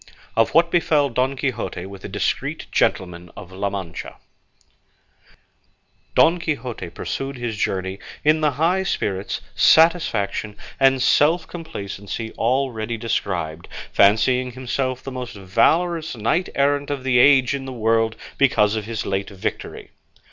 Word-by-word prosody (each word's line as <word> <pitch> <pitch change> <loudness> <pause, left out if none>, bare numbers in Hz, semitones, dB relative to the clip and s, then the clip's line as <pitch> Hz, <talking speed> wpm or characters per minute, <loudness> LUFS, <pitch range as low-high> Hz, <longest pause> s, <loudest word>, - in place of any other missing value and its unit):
OF 115 +4 +2
WHAT 170 +1 +5
BEFELL 150 -4 +2
DON 130 +3 0
QUIXOTE 130 -7 -3
WITH 95 0 -10
A - - -5
DISCREET 100 +1 -2
GENTLEMAN 90 -1 0
OF 95 - -10
LA 100 +2 -2
MANCHA 95 -5 -6 2.0
Don 170 +2 +5
Quixote 130 - -4
pursued 135 +9 -5
his 120 -2 -3
journey 95 -1 -2 0.2
in 155 +1 +3
the 150 - +3
high 170 +7 +1
spirits, 100 - -2
satisfaction, 115 - +3 0.2
and 135 -1 +4
self 160 +5 +3
complacency 110 - -6
already 120 -2 -1
described, 90 -8 -3 0.3
fancying 125 +5 +3
himself 130 +1 -3
the 135 - -6
most 125 -3 -6
valorous 160 - +1
knight 115 - 0
errant 140 0 +1
of 140 -3 -3
the 130 -2 +3
age 135 0 +5
in 135 -1 -4
the 130 - -6
world 115 -1 +1 0.2
because 110 -6 +3
of 110 -2 -3
his 115 -1 -4
late 100 0 -2
victory. 95 -2 -5
125 Hz, 135 wpm, -22 LUFS, 100-140 Hz, 2.0 s, WHAT